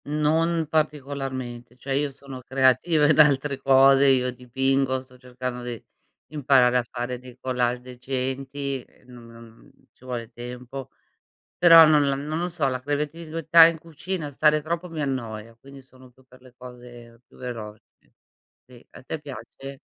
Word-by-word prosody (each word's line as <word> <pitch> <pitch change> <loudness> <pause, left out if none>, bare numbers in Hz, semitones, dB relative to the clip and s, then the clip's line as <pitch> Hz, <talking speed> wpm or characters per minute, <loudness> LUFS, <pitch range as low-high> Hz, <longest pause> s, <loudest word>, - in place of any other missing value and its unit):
Non 160 +3 0
particolarmente, 135 -5 -3
cioè 135 +2 -5
io 145 +1 0
sono 135 -1 -11
creativa 135 +5 +2
in 155 - +3
altre 140 -2 +3
cose, 135 +1 +5
io 125 -2 +3
dipingo, 130 +2 -1
sto 130 -1 -18
cercando 125 0 -6
di 120 -3 -6 0.5
di - - -11
imparare 130 -3 +4
a 125 - +1
fare 120 0 -5
dei 125 -1 -14
collage 125 -1 -1
decenti, 130 +2 -4
e, - - -28
non 120 -2 -14
non, 115 0 -14
mhmm, 115 0 -18 0.2
ci 130 - -22
vuole 120 -2 -6
tempo. 125 +2 -9 0.7
Però 165 -2 +9
non 150 -2 +4
l 140 - +1
non 150 +2 -4
lo 175 - -1
so, 165 -5 -1
la 130 -1 -2
creatività 160 +3 +3
in 165 -1 +1
cucina 165 0 -6
stare 150 +2 +2
troppo 170 +3 -4
mi 160 -2 -5
annoia, 115 -5 -5
quindi 140 +1 -14
sono 130 -1 -19
più 130 +2 -25
per 125 0 -20
le 130 -1 -18
cose 120 -2 -13
più - - -22
velo 115 -4 -7 0.9
ì,s 125 -1 -17
a - - -13
te 155 - -5
piace? 135 0 -10
130 Hz, 165 wpm, -24 LUFS, 125-145 Hz, 0.9 s, Però